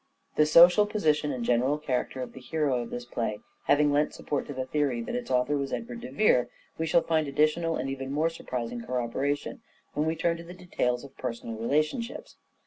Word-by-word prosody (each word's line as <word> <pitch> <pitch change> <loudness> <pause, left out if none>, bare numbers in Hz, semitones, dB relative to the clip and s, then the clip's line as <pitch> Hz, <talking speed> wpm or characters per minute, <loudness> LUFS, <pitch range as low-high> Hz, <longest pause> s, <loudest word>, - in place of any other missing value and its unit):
The 150 - +4
social 175 +6 +7
position 155 -8 +1
and 125 -3 -3
general 125 +5 +2
character 130 -3 -2
of - - -9
the - - -10
hero 135 -1 0
of 120 - -6
this 120 0 -5
play 115 -3 -3 0.3
having 145 0 +4
lent 150 +1 +1
support 145 - -3
to 145 - -5
the 130 0 -2
theory 140 -3 0
that - - -5
its 245 0 -3
author 130 +3 +2
was 140 -2 -2
Edward 235 0 -5
de 245 - -7
Vere, 125 - +3 0.3
we 160 - 0
shall 165 +2 +4
find 160 -2 +1
additional 155 +4 +1
and 130 - -2
even 135 0 -4
more 155 +3 +1
surprising 120 -6 -4
corroboration 135 - -2 0.3
when 150 +1 0
we 160 - 0
turn 170 0 0
to 170 - -9
the 175 +2 -10
details 125 -9 -1
of 140 - -12
personal 115 -2 -4
relationships. 155 - -1
145 Hz, 205 wpm, -28 LUFS, 125-165 Hz, 0.3 s, social